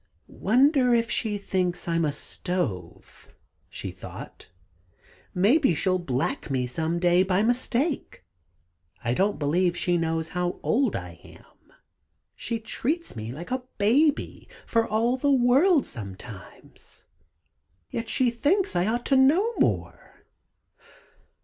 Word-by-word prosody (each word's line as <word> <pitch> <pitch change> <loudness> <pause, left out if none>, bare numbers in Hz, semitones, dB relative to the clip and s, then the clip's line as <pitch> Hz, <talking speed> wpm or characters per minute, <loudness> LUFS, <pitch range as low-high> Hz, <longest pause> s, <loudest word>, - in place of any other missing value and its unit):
"Wonder 255 +2 +4
if 230 -1 0
she 215 -1 -1
thinks 180 -3 -2
I'm 165 -1 +1
a 150 - 0
stove," 125 - -5 0.4
she - - -6
thought. - - -11 0.9
"Maybe 210 - +3
she'll 185 +3 +1
black 135 -6 -2
me 130 -2 0
some 160 +7 -2
day 175 +1 +3
by 190 +1 +2
mistake! 250 - -1 0.8
I 120 - 0
don't 195 +7 +1
believe 170 +5 +1
she 175 0 +1
knows 165 0 -1
how 180 0 -2
old 255 -2 +1
I 90 -1 -7
am - - -16 0.9
she 235 - -3
treats 295 +9 -3
me 110 0 -5
like 170 - -8
a 255 0 -1 0.2
baby, 275 +9 +1 0.2
for 230 -1 +1
all 230 +4 +1
the 285 +2 0
world 275 +6 +4
sometimes, 100 -3 -11 0.9
yet 230 -1 -4
she 250 -2 +2
thinks 355 - +1
I 175 +2 +2
ought 240 +2 -1
to 275 - +2
know 325 - +4
more. - - -2
200 Hz, 125 wpm, -26 LUFS, 165-255 Hz, 0.9 s, Wonder